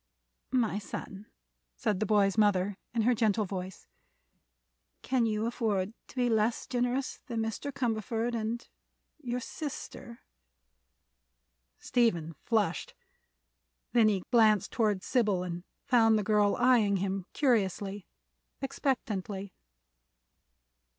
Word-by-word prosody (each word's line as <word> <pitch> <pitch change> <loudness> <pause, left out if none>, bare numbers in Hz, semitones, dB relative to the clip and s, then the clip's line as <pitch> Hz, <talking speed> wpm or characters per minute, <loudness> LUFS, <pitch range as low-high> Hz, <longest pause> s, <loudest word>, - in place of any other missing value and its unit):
"My 225 -5 +2
son," 200 0 -7 0.5
said 185 - -1
the 215 - 0
boy's 200 -3 +3
mother, 205 -2 +3 0.2
in 230 -2 0
her 250 +3 +4
gentle 215 -2 +2
voice, 185 -1 -6 1.2
"can 250 -3 +2
you 215 0 0
afford 215 -4 -1
to - - -15
be 250 -1 +2
less 225 0 +1
generous 250 +2 -1
than 235 -3 -3
Mr. 225 +6 -3
Cumberford 235 -2 -1
and—your 235 +3 -6
sister?" 250 -4 -7 1.6
Stephen 175 -10 +1
flushed. 205 -2 -1 1.0
Then 230 -3 +6
he 195 -3 0
glanced 220 -4 +4
toward 210 -5 +1
Sybil 210 -8 +1
and 175 -1 -5 0.2
found 225 -3 +5
the 210 - 0
girl 210 -1 +3
eyeing 235 -5 +4
him 190 0 -2
curiously, 205 - 0 0.5
expectantly. 210 -8 -2
220 Hz, 105 wpm, -30 LUFS, 200-240 Hz, 1.6 s, Then